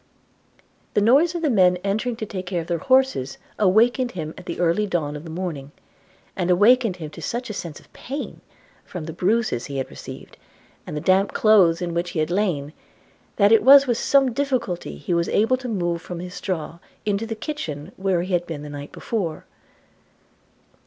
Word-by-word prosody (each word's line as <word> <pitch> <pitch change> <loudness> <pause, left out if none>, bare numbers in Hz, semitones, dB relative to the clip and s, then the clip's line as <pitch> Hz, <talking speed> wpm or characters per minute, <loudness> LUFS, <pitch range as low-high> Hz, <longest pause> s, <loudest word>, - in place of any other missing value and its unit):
The 210 - +4
noise 285 +11 +4
of 340 - -3
men 185 - +4
entering 215 +5 -1
to 220 - -5
take 185 -3 -6
care 180 -2 -1
of - - -8
their 170 -1 -2
horses 260 - +2 0.2
awakened 235 +5 +3
him 160 -3 -5
at - - -13
the - - -5
early 175 +4 +2
dawn 155 -6 -2
of 150 +2 -8
the - - -8
morning; 160 -5 -5 0.6
and 180 -3 -1
awakened 215 +3 +4
him 155 -4 -8
to 165 - -10
such 240 - -3
a - - -5
sense 170 -6 -6
of - - -24
pain, 280 +3 -6 0.4
from 180 -3 -7
the 160 - -6
bruises 195 - 0
he 140 - -5
had 135 - -3
received, - - -10 0.5
and 150 - -5
the - - -3
damp 190 +4 +2
clothes 185 -6 +4
in 170 -1 -3
which 170 +1 -1
he 170 - -3
had 155 +2 0
lain, 170 -7 -1 0.6
that 200 0 +4
it 225 - +6
was 275 +1 +8
with 240 -3 0
some 270 -3 +3
difficulty 235 - -2
he 75 - -3
was 170 0 +1
able 225 +5 +2
to 255 -1 -6
move 175 -5 -1
from 175 0 -7
his 180 +1 -7
straw 170 -4 -4 0.3
into 210 +2 -1
the 225 - -4
kitchen, 215 - -5
where 190 -3 0
he 185 +1 -4
had 175 0 0
been 150 -3 -6
the 150 - -8
night 145 0 -8
before. 180 -9 -4
185 Hz, 195 wpm, -23 LUFS, 165-225 Hz, 0.6 s, was